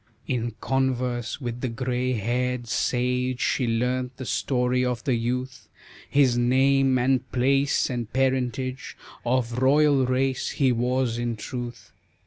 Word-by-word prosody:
In 120 -3 -2
converse 125 -3 -1
with 120 -2 -5
the 130 - -1
gray 125 +1 -1
haired 125 +2 -1
sage 125 +1 0
She 125 - +1
learnt 125 +2 -1
the 130 - -6
story 125 +3 0
of 125 -1 -2
the 130 - +1
youth, 125 +2 -3 0.4
His 135 -4 +4
name 130 +2 +3
and 130 0 +1
place 135 +2 +2
and 120 -3 -4
parentage 130 0 -1 0.3
Of 120 -1 0
royal 140 0 +4
race 130 0 0
he 135 -3 +3
was 125 0 0
in 120 -1 -2
truth. 120 +2 -7
125 Hz, 130 wpm, -25 LUFS, 120-130 Hz, 0.4 s, His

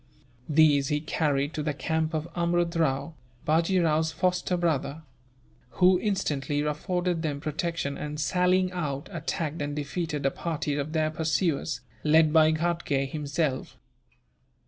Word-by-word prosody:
These 150 -2 +5
he 150 +1 +1
carried 150 -1 0
to 155 - -2
the 150 -1 -2
camp 160 +1 -1
of 155 +1 -2
Amrud 175 0 +1
Rao, 150 -1 0 0.3
Bajee 170 +4 +2
Rao's 160 0 +2
foster 180 +2 0
brother; 160 -2 -1 0.7
who 180 0 +5
instantly 150 -9 -1
afforded 175 +3 -1
them 150 -3 -2
protection 155 -1 -3
and, 150 0 -5
sallying 180 +3 +2
out, 145 -6 -3
attacked 160 -1 -3
and 145 0 -3
defeated 150 0 -3
a 135 - +3
party 155 -2 -3
of 145 +2 -3
their 155 -1 +1
pursuers, 160 0 0 0.2
led 155 0 +4
by 160 -1 +6
Ghatgay 155 -4 -1
himself. 150 -2 -2
155 Hz, 135 wpm, -27 LUFS, 145-170 Hz, 0.7 s, by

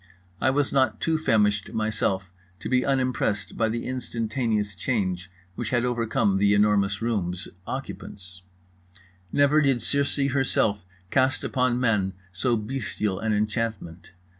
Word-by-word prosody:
I - - +4
was 140 +1 +1
not 135 -1 +2
too 160 -1 +1
famished 105 -7 +2
myself 110 -4 -1 0.3
to - - -4
be 130 0 +2
unimpressed 130 -6 0
by 110 -1 +1
the 115 +1 -3
instantaneous 115 -4 -1
change 95 -3 -2 0.2
which 110 +4 -4
had 120 -1 +1 0.3
come 105 - +2
over 95 - +1
The 100 0 +4
Enormous 100 0 +2
Room's 95 -6 -1 0.2
occupants. 90 -2 -7 0.9
Never 145 +2 +4
did 135 -4 +2
Circe 140 0 +1
herself 110 -8 +1 0.2
cast 130 +2 +2
upon 125 -2 +1
men 105 -6 +1 0.2
so 115 +6 +1
bestial 105 -4 -2
an 110 +1 -1
enchantment. 105 -5 -2
110 Hz, 135 wpm, -26 LUFS, 100-130 Hz, 0.9 s, I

